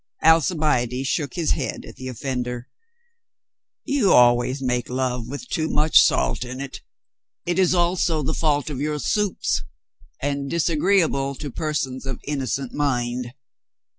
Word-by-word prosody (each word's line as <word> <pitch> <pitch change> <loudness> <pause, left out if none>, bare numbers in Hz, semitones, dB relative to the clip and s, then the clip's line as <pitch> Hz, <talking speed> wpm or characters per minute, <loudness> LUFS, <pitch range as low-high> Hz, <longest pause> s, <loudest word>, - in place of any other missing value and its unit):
Alcibiade 150 -6 +3
shook 145 -1 -1
his 170 -3 0
head - - -2
at - - -11
the 130 0 -7
off"ender. 125 -1 -4 1.2
"You 270 -9 +2
always 120 +2 +4
make 125 -2 -1
love 125 -2 -2
with 145 - -7
too 160 -7 -1
much 155 +1 +5
salt 65 - +2
in 130 +1 -7
it. 140 -1 -7 0.6
It 175 +1 0
is 185 -1 +4
also 175 -2 +1
the 155 - -1
fault 150 -2 0
of 135 -2 -4
your 150 0 -1
soups. 205 - 0 0.6
And 140 0 -2
disagreeable 160 -4 +1
to 145 0 -6
per 155 +3 -3
sons 130 -1 -3
of 130 - -4
innocent 135 -2 -3
mind." 125 -3 -1
140 Hz, 140 wpm, -23 LUFS, 125-160 Hz, 1.2 s, much